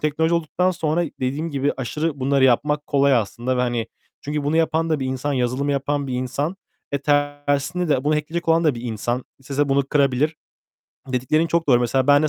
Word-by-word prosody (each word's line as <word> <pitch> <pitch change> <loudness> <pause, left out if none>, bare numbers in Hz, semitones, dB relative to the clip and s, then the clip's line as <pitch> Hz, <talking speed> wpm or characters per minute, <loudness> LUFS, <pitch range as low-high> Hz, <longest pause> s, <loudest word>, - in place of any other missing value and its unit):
teknoloji 160 +2 +1
olduktan 170 +3 +1
sonra 165 0 0 0.2
dediğim 145 +6 -2
gibi 140 0 0
aşırı 145 +3 -3
bunları 135 0 +3
yapmak 150 +4 +2
kolay 140 -1 +3
aslında 120 +3 -1
ve, - - +1
hani, 120 -2 -1 0.3
çünkü 145 0 -3
bunu 155 +3 +1
yapan 165 0 +1
da 155 -3 +1
bir 130 - -1
insan, 130 +2 -2
yazılımı 130 +2 0
yapan 140 +1 -1
bir 130 - -3
insan 140 +8 -2 0.4
ve 140 - +1
tersine 145 +4 0
de 135 -2 +1
bunu 150 +1 +2
hack'leyecek 165 +3 -3
olan 165 +1 +4
da 150 -5 +3
bir 115 - -7
insan, 120 +2 -2
istese 140 +2 -1
bunu 135 0 +2
kırabilir. 140 +2 +1 0.7
Dediklerin 130 +6 +1
çok 165 -1 0
doğru, 125 -2 +5
mesela 130 +2 +1
ben 145 +1 +6
de 155 - +2
145 Hz, 195 wpm, -22 LUFS, 130-155 Hz, 0.7 s, ben